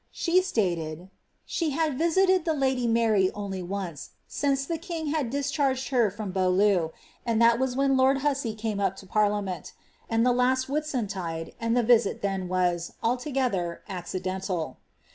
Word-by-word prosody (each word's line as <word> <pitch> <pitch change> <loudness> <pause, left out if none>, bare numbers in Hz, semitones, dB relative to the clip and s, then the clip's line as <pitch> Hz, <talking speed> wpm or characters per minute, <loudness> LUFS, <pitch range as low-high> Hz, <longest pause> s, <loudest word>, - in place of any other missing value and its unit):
She 360 +2 +2
staled, 175 - -2 0.4
'^she 320 -4 -1
had 310 -1 0
visited 355 +3 +3
ihe 315 - +1
lady 260 -3 +1
Mary 225 -5 +3
only 200 -2 -4
once 180 -4 -5 0.2
since 275 -1 0
the 330 +2 -3
king 325 -4 -3
had 295 -7 0
discharged 275 -1 0
her 240 -5 +3
from 205 0 -6
Beautieu, 185 -2 +2 0.3
and 230 -1 0
that 235 0 +5
was 260 -1 0
when 275 0 +2
lord 265 +1 +3
Hussey 270 -6 0
Fftme 215 -2 -2
up 195 0 0
lo 190 - -13
parliament, 205 -3 0 0.4
and 225 +1 +2
the 250 - +4
last 255 +1 +2
Whiunntide, 205 - -3
and 230 +1 +1
ihc 240 - +2
visit 230 -4 +3
then 195 -2 -1
was, 175 -2 0
aliogether, 245 - -1
accidental." 185 -4 -4
230 Hz, 155 wpm, -27 LUFS, 190-270 Hz, 0.4 s, that